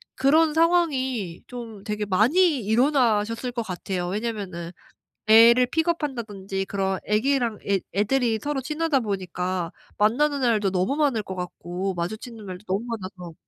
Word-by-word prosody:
그런 300 +4 +4
상황이 265 - +1
좀 230 -5 -8
되게 210 0 -3
많이 270 - +3
일어나셨을 230 0 +2
것 235 - -3
같아요. 180 -2 -4
왜냐하면은 195 -4 -4 0.6
애를 235 +3 +7
pick 320 +5 0
up한다든지 210 - -3
그런 190 -1 -1
아기랑 235 0 +1
애 195 -1 +2 0.2
애들이 225 +2 +2
서로 290 -2 -1
친하다 305 +1 0
보니까 185 -4 -3 0.3
만나는 280 +7 +2
날도 220 -5 +2
너무 190 +9 0
많을 275 -8 +1
것 190 - -6
같고 180 +1 -4
마주치는 215 +5 -5
날도 185 +1 -8
너무 195 +5 -1
많아서 185 -7 -7
220 Hz, 340 characters per minute, -24 LUFS, 195-265 Hz, 0.6 s, 애를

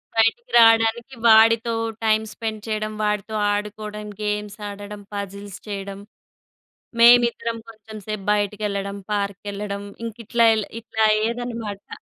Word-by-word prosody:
బయటికి 455 - +2
రావడానికి 225 +2 +4
వాడితో 225 +1 +6 0.3
టైమ్ 220 0 +3
స్పెండ్ 220 -2 -5
చేయడం, 215 0 -2
వాడితో 210 +1 -1 0.2
ఆడుకోవడం, 210 0 -5
గేమ్స్ 210 0 -3
ఆడడం, 205 +1 -8
పజిల్స్ 200 -1 -6
చేయడం, 200 -1 -5 1.0
మేమిద్దరం 235 -1 +5
కొంచెం 220 0 -12
సేపు 215 -2 -4
బయటకెళ్ళడం, 205 -1 -2 0.2
పార్క్‌కెళ్ళడం 200 0 -3 0.2
ఇంక 225 -1 -6
ఇట్లా 230 +1 +3
ఏళ్ళే 215 -2 -2
ఇట్లా 220 -1 -2
అయ్యేదన్నమాట. 225 -2 -3
215 Hz, 110 wpm, -22 LUFS, 205-225 Hz, 1.0 s, వాడితో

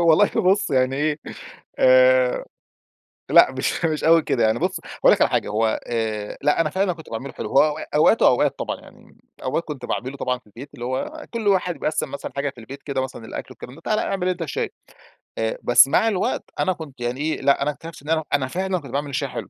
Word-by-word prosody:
والله 170 +4 +5
بُص 200 -1 +2
يعني 130 0 +2
إيه، 150 +1 0 0.6
آآ - - +5 0.9
لأ، - - +7
مش - - -2
مش 155 -2 -1
أوي 165 0 +6
كده 120 - 0
يعني 110 0 +2
بُص، - - -1
هاقول - - +2
لك - - -1
على - - +5
حاجة، - - 0
هو 110 +1 0
آآ 110 -3 -3
لأ، 150 +3 +3
أنا 160 - 0
فعلًا 190 +2 0
كنت 160 -1 -13
باعمله 130 +4 -6
حلو، - - -6
هو 150 +2 +3
أ - - -6
أوقات 155 +9 +4
وأوقات - - +3
طبعًا - - -3
يعني. - - -18 0.3
أوقات 170 - -1
كنت 145 -7 -7
باعمله 130 +3 -4
طبعًا 125 -1 -2
في 120 - -29
البيت، 120 +7 -11
اللي 120 - -7
هو 135 - -4
كل 230 -3 -2
واحد 180 -3 +2
بيقسّم 155 - -2
مثلًا 140 - -6
حاجة 140 0 -1
في 135 - -15
البيت 135 +5 -10
كده، 135 -2 -2
مثلًا 130 -3 -6
الأكل - - -6
والكلام 125 - -11
ده، 165 - -15
تعالَ 215 +3 0
اعمل 185 -2 -1
أنت 180 -1 -3
الشاي. 160 - -3 0.7
آآ 110 0 -1
بس 120 +2 +7
مع 220 - +2
الوقت 200 -4 0 0.2
أنا 185 - +2
كنت 145 -7 -11
يعني 120 +3 -2
إيه، 155 +1 -1
لأ، 140 - +3
أنا 150 +2 +1
أكتشفت 165 +1 -11
إن 150 - -10
أنا 160 -1 +1
أنا 135 -2 +2
فعلًا 185 +5 -2
كنت 140 -6 -11
باعمل 145 +2 -2
الشاي 140 0 -2
حلو. - - -6
150 Hz, 225 wpm, -22 LUFS, 130-180 Hz, 0.9 s, لأ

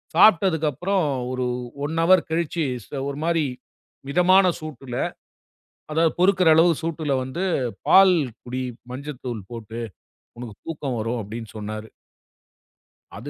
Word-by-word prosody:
சாப்பிட்டதுக்கப்புறம் 180 - +4 0.3
ஒரு 130 -1 -1 0.4
own 160 +3 -2
hour 185 +1 +5
கழிச்சு 165 0 -1 0.2
ச - - -25 0.2
ஒரு 140 - -5
மாரி 165 -2 +1 0.6
மிதமான 180 +5 +5
சூட்டுல, 135 -5 -7 1.0
அதாவது 160 0 +3
பொறுக்குற 185 -2 +4
அளவு 170 +2 +6
சூட்டுல 155 -3 -2
வந்து 160 +9 -4 0.4
பால் 190 -2 +7 0.3
குடி 130 +1 -4 0.3
மஞ்சத்தூள் 125 -6 -6
போட்டு 115 0 -7 0.6
உனக்குத் 115 -4 -9
தூக்கம் 140 -7 -3
வரும் 115 +2 -2
அப்படின்னு 110 +2 -7
சொன்னாரு. 110 +1 -6 1.3
அது - - -7
150 Hz, 115 wpm, -23 LUFS, 125-170 Hz, 1.3 s, பால்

